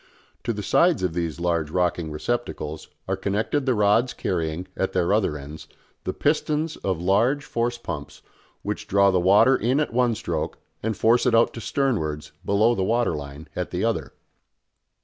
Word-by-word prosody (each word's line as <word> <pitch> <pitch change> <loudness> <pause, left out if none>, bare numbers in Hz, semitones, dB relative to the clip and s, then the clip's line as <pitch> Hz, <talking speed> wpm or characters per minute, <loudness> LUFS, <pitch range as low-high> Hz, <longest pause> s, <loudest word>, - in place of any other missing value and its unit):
To 120 - +1
the 105 -2 -4
sides 160 - +3
of 90 -3 0
these 85 -1 -3
large 85 -3 0
rocking 85 -1 0
receptacles 80 -3 -3 0.2
are 95 - 0
connected 105 +9 -1
the 130 - +3
rods 105 +4 +3
carrying, 85 0 -2
at 95 - -1
their 90 +1 +2
other 100 -8 +1
ends, 75 +2 -9 0.4
the - - 0
pistons 155 +1 0
of 95 -4 -2
large 115 +11 +2
force 120 +1 -1
pumps 75 -11 -7 0.4
which 105 0 -4
draw 100 0 +4
the 95 - +2
water 105 +8 +5
in 130 +5 +1
at 150 - -1
one 120 -1 +2
stroke 85 -6 -3 0.2
and 110 -2 -2
force 120 +3 +3
it 120 - +4
out 115 - +4
to - - -7
sternwards, 80 - -1
below 105 +4 +3
the 95 - -1
water 115 -3 +1
line, 70 +1 -8
at 90 - -2
the 90 +4 -1
other. 115 -1 -2
100 Hz, 175 wpm, -24 LUFS, 85-120 Hz, 0.4 s, water